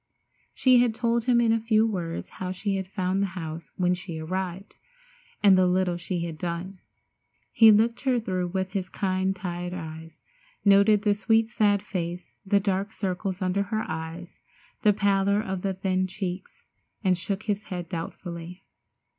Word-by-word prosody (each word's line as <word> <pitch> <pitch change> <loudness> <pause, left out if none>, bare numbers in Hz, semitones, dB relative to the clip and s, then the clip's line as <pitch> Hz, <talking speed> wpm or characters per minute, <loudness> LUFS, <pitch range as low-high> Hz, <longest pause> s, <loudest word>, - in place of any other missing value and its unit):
She 255 -2 +5
had 240 -2 +2
told 235 -1 0
him 245 -2 +4
in 235 -1 +3
a 225 - +2
few 220 0 +3
words 175 -6 -3
how 185 -1 -2
she 195 +2 -2
had 190 -1 -4
found 185 0 -1
the 200 - +1
house 160 -1 -6
when 180 -1 +2
she 175 -2 -6
arrived, 185 +4 -4 0.7
and 200 -2 +7
the 185 0 +4
little 180 -1 +1
she 175 0 -3
had 160 -2 -6
done. 180 +3 -4 0.7
He 225 -1 +8
looked 225 +3 +3
her 260 -3 +2
through 185 -5 -2
with 190 +1 -3
his 190 -3 -2
kind 190 0 -1
tired 180 -1 -4
eyes, 160 -1 -8 0.5
noted 200 +1 +5
the 205 -1 +4
sweet, 225 +2 +2
sad 205 -4 +2
face, 175 -2 -5
the 200 +1 +3
dark 200 +1 -1
circles 190 0 -3
under 185 +2 +1
her 215 +2 -2
eyes, 160 +2 -6 0.4
the 210 - +5
pallor 200 0 +2
of 190 -3 -3
the 195 0 -1
thin 185 0 0
cheeks, 185 0 -6 0.4
and 185 -2 +3
shook 195 +4 -4
his 210 -1 -2
head 175 -3 -5
doubtfully. 170 +1 -7
190 Hz, 170 wpm, -26 LUFS, 180-205 Hz, 0.7 s, He